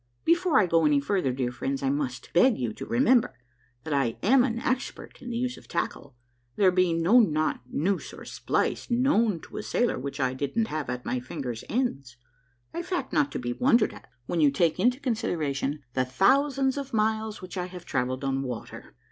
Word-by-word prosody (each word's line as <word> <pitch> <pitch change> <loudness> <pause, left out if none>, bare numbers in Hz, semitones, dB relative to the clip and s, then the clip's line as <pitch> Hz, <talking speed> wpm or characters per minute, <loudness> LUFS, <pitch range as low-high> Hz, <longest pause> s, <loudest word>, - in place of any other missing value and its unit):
Before 340 -5 +4
I 205 - +4
go 165 -2 +2
any 145 -1 +4
farther, 145 -2 0
dear 125 -1 -2
friends, 135 +3 -3
I 135 - +2
must 130 -4 -4
beg 245 +7 +5
you 120 -4 -2
to - - -8
remember 245 0 +3 0.5
that 160 - -3
I 135 -5 0
am 250 +5 +5
an 235 -3 -1
expert 255 +3 -3
in 250 - -7
the 235 - -3
use 250 +1 -2
of - - -15
tackle, 140 -2 -4 0.4
there 190 -2 +4
being 175 -2 +2
no 220 +9 +6
knot, 155 -8 +1
noose, 180 +9 -1
or - - -11
splice - - -1
known 235 - +2
to - - -10
a - - -2
sailor 240 - 0
which 140 +2 -6
I 130 -1 +1
didn't 145 - -1
have 155 -4 -3
at 125 0 -4
my 125 - -1
fingers' 125 -2 -6
ends, 140 - -2 0.6
a 340 - -3
fact 360 +1 -3
not 290 -1 +2
to - - -2
be 120 0 -3
wondered 245 - +3
at - - -14 0.2
when 165 - -1
you 145 - +6
take 155 +3 +1
into 250 +2 +2
consideration 155 - -2
the 130 - +1
thousands 265 - +2
of 275 -4 -5
miles 220 0 0
which 185 - -8
I 180 -1 -2
have 180 -1 -10
travelled 130 +1 -2
on 135 0 0
water. 125 -4 -7
180 Hz, 200 wpm, -27 LUFS, -, 0.6 s, no